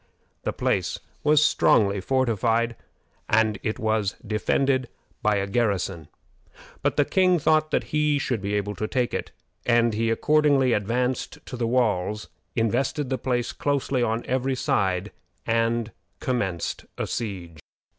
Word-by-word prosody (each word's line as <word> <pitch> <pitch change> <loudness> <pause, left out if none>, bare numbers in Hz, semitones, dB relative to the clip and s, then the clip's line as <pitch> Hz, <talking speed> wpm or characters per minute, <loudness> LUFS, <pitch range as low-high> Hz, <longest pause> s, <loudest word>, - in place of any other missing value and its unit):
The - - -2
place - - -1 0.3
was 150 0 +5
strongly 100 -9 +3
fortified, 115 -1 +1 0.5
and 110 -2 +3
it 110 - -2
was 110 -4 0
defended 130 +4 +1 0.3
by 105 0 +2
a 100 -1 0
garrison; 100 -6 -1 0.7
but - - 0
the 145 - +4
king 185 +1 +3
thought 155 0 +2
that - - +1
he 150 -1 +3
should 125 -6 -1
be 100 +1 -2
able 105 0 -1
to 110 - -2
take 125 0 -1
it, - - -3 0.3
and 120 -1 +3
he 115 +1 0
accordingly 140 0 +3
advanced 125 +5 -1
to - - -7
the 120 -2 -1
walls, 105 -4 0 0.3
invested 130 +5 0
the 130 - 0
place 120 -2 -1
closely 140 -2 0
on 115 0 0
every 130 +1 0
side, 95 -4 0 0.3
and 115 0 +1 0.3
commenced 100 -10 -2
the - - -2
siege. 90 -8 -5
115 Hz, 140 wpm, -25 LUFS, 105-130 Hz, 0.7 s, was